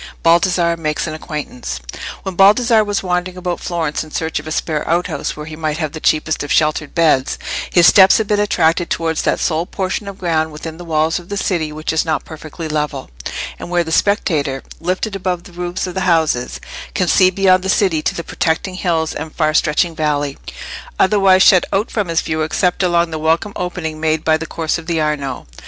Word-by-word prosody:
Baldassarre 170 0 +3
makes 155 -2 -2
an 155 - -4
Acquaintance. 150 - -5 0.4
When 190 - -4
Baldassarre 215 +4 +5
was 205 -1 -2
wandering 180 0 -2
about 180 -1 -3
Florence 165 -4 -2
in 155 - -12
search 160 0 -2
of 150 - -10
a - - -5
spare 155 -1 -2
outhouse 170 -1 -1
where 150 - -6
he 155 0 -8
might 155 -1 -2
have 155 -3 -2
the 160 - -7
cheapest 155 0 +1
of 145 - -4
sheltered 155 -1 +1
beds, 155 -6 +2 0.3
his 175 -2 +5
steps 190 0 +7
had 220 - 0
been 210 0 +1
attracted 175 -4 +2
towards 160 -1 -1
that - - 0
sole 165 +1 0
portion 195 +1 -3
of 200 -1 -7
ground 160 -3 0
within 160 +1 -7
the 175 - -9
walls 160 0 +1
of 175 - -15
the 205 - -3
city 170 -6 -1
which 155 +1 -3
is 160 - +2
not 160 -1 -2
perfectly 160 +1 -8
level, 150 - -3 0.5
and - - -7
where 175 -1 +2
the 160 - -6
spectator, 155 -9 +1 0.2
lifted 185 +4 -2
above 180 -2 -2
the - - -14
roofs 175 +1 -3
of 180 - -5
the 190 - -2
houses, 160 -9 +1 0.4
can 180 - +1
see 185 +2 +5
beyond 185 0 +3
the 190 - -3
city 185 -6 +2
to - - -1
the 170 - -4
protecting 165 +4 -1
hills 165 -4 -1
and 155 +1 -7
far 155 -2 +1
stretching 165 +2 +2
valley, 145 -3 -1 0.6
otherwise 190 -2 +5
shut 185 -4 +6
out 200 +3 0
from 210 -4 -1
his 165 -1 +1
view 155 0 -2
except 180 +4 0
along 175 -2 +2
the 160 - -3
welcome 165 +6 +1
opening 170 -3 -4
made 155 0 0
by 160 - +4
the 160 +1 -4
course 160 +1 -2
of 165 - -12
the 170 -2 0
Arno. 145 -4 -2
165 Hz, 210 wpm, -18 LUFS, 155-185 Hz, 0.6 s, steps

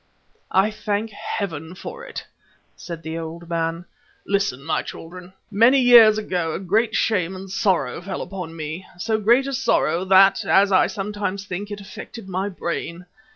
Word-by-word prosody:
"I 195 +3 +3
thank 215 0 -2
Heaven 170 -5 -5
for 470 - -8
it," - - -7 0.5
said 170 -2 -8
the 160 +1 -4
old 165 +1 -7
man. 165 0 -2 0.4
"Listen, 200 -9 0
my 160 - 0
children. 180 +2 -10 0.2
Many 230 +7 +5
years 235 -4 +8
ago 175 -6 -2
a - - -3
great 215 +4 +1
shame 190 -4 +1
and 190 +1 -8
sorrow 190 -3 0
fell 190 +2 -4
upon 180 -4 -7
me, 160 +3 -5
so 220 +4 -1
great 235 +6 +4
a 275 - -3
sorrow 180 -9 +1
that, 195 +1 +5
as 200 +1 +4
I 185 - +5
sometimes 200 -1 -4
think, 195 +2 -5
it 205 -1 -6
affected 200 +2 -10
my 190 +2 -2
brain. 170 -1 -5
195 Hz, 160 wpm, -22 LUFS, 170-210 Hz, 0.5 s, years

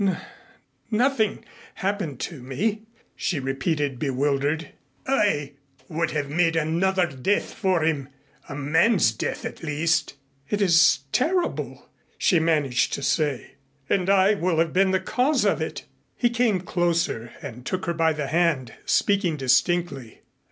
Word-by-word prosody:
"N 190 -3 +1 0.7
nothing 225 -1 +1 0.3
happened 190 - -3
to 155 -7 -5
me," 200 - -2 0.3
she 160 - -1
repeated 135 0 -2
bewildered. 145 +3 0 0.4
"I 205 - +1 0.4
would 165 0 -1
have 145 -2 -2
made 165 +3 +1
another 175 +4 +1
death 160 +6 -1
for 190 -6 +1
him 145 -4 -1 0.4
a 140 - -5
man's 160 - +3
death 110 - -4
at - - -6
least." 155 -1 0 0.3
"It 205 - 0
is 170 -6 +5
terrible," 345 +8 -1 0.3
she 175 - +3
managed 150 -6 +1
to 140 - -3
say, 145 -5 0 0.4
"and 190 -1 +1
I 195 +1 +5
will 180 -4 0
have 165 0 +1
been 190 +1 +3
the 190 0 +2
cause 255 +9 +1
of - - +1
it." - - -5 0.3
He 240 -1 +2
came 235 -6 +1
closer 170 -10 -1
and 125 +1 -9
took 185 +8 -3
her 170 - -1
by 165 -1 +2
the 150 -1 -3
hand, 150 -6 0
speaking 200 -6 +2
distinctly. 135 -1 0
165 Hz, 140 wpm, -24 LUFS, 145-190 Hz, 0.7 s, is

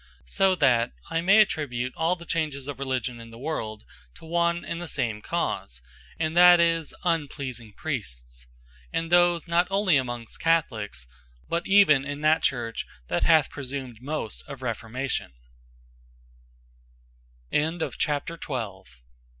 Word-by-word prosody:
So 190 - +2
that 125 - +3 0.2
I 165 - +1
may 195 +5 +6
attribute 130 - -1
all 165 +2 +1
the 170 -1 -12
changes 150 -5 -2
of 145 -2 -6
Religion 130 -3 -2
in 115 0 -10
the 115 - -12
world, 110 -6 -4 0.3
to - - -13
one 170 +1 0
and 170 - -4
the 175 - -5
some 120 -8 -2
cause; - - -3 0.4
and 160 0 -1
that 175 0 +8
is, 165 -2 +1
unpleasing 140 -9 -2
Priests; 60 - -6 0.4
and 165 0 -2
those 175 -1 +4
not 170 +2 +2
onely 195 -5 +3
amongst 120 -3 -4
Catholiques, 110 - 0 0.4
but 170 +1 -2
even 195 -9 +6
in 145 +1 -5
that 155 +1 +4
Church 120 -4 -1 0.2
that 85 - +1
hath 160 -2 +4
presumed 130 -4 -6
most 140 -6 -4
of 140 -2 -8
Reformatio 120 +2 -3
145 Hz, 125 wpm, -26 LUFS, 120-170 Hz, 0.4 s, that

